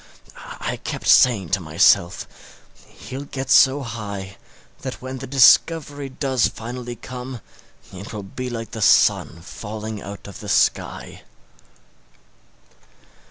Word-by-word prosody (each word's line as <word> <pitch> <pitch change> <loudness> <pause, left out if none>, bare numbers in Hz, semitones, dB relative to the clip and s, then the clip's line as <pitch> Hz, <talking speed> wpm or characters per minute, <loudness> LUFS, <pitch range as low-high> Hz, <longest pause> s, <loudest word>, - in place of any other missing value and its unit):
I - - -3
kept - - -6
saying 105 -9 +5
to - - +1
myself, 85 0 +2 0.6
he'll 135 +2 -9
get 135 -1 -5
so 135 +1 +5
high 100 -4 -7 0.4
that 100 - -6
when 130 +1 -6
discovery 140 +2 +3
does 130 -2 0
finally 120 +1 -7
come 125 0 -8 0.5
it 95 +3 -9
will 105 -2 -6
be 125 +6 -6
like 115 -2 -6
the 110 - -6
sun 85 -3 +3
falling 110 +2 -7
out 100 +1 -9
of 100 - -10
the - - -8
sky. - - 0
120 Hz, 115 wpm, -22 LUFS, 105-130 Hz, 0.6 s, saying